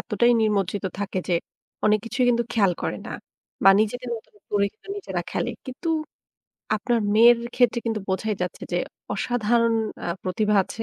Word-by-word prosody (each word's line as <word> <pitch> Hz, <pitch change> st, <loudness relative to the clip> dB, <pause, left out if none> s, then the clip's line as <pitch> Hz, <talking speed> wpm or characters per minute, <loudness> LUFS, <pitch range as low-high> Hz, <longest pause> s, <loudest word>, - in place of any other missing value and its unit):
এতটাই 240 Hz, +3 st, +2 dB
নিমজ্জিত 205 Hz, -2 st, 0 dB
থাকে 200 Hz, -2 st, -2 dB
যে, 175 Hz, -, +3 dB, 0.5 s
অনেক 215 Hz, 0 st, +5 dB
কিছুই 245 Hz, +2 st, 0 dB
কিন্তু 235 Hz, 0 st, +1 dB
খেয়াল 200 Hz, -5 st, +3 dB
করে -, -, -2 dB
না। -, -, -6 dB, 0.5 s
বা 195 Hz, -, +10 dB
নিজেদের 245 Hz, +3 st, -1 dB
মতন 225 Hz, -, -14 dB, 0.2 s
করে 200 Hz, -1 st, +2 dB, 0.3 s
নিজেরা 405 Hz, -, -3 dB
খেলে। -, -, -1 dB, 0.2 s
কিন্তু 260 Hz, +6 st, -5 dB, 0.9 s
আপনার 235 Hz, +3 st, 0 dB, 0.2 s
মেয়ের 235 Hz, +2 st, +7 dB, 0.2 s
ক্ষেত্রে 245 Hz, -1 st, +3 dB
কিন্তু 220 Hz, -1 st, 0 dB
বোঝাই 205 Hz, +3 st, 0 dB
যাচ্ছে 180 Hz, -, -4 dB
যে 175 Hz, -, +2 dB, 0.4 s
অসাধারণ 230 Hz, +1 st, +2 dB, 0.3 s
আ -, -, -2 dB
প্রতিভা 210 Hz, +3 st, +1 dB
আছে। 225 Hz, -, -6 dB
220 Hz, 155 wpm, -24 LUFS, 205-240 Hz, 0.9 s, বা